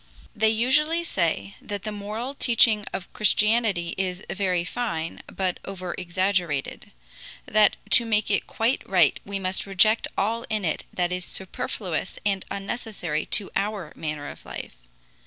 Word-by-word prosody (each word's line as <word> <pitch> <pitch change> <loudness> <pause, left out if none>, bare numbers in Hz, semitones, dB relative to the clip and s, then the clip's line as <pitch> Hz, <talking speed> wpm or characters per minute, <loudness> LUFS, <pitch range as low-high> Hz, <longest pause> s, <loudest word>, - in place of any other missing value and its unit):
They 220 +1 +4
usually 295 +9 +2
say 160 - 0
that 205 -2 -5
the 215 - -3
moral 210 +6 -4
teaching 225 -5 +4
of 180 - -6
Christianity 210 -4 +2
is 185 -1 -2
very 185 -3 +1
fine, 175 -7 -3
but 185 -2 -2
overexaggerated; 180 -4 -2 0.6
that 215 0 +4
to 235 - +8
make 215 -2 +1
it 200 - +1
quite 230 +4 +1
right 180 -6 +4
we 200 0 -3
must 190 +1 -2
reject 215 +3 +4
all 225 +4 0
in 215 -3 0
it 155 - -1
that 175 -1 0
is 180 0 -2
superfluous 190 -2 -3
and 195 -2 +1
unnecessary 195 -6 -3
to 205 - 0
our 200 -5 -2
manner 150 -2 -4
of - - -9
life. - - -7
195 Hz, 140 wpm, -25 LUFS, 180-220 Hz, 0.6 s, to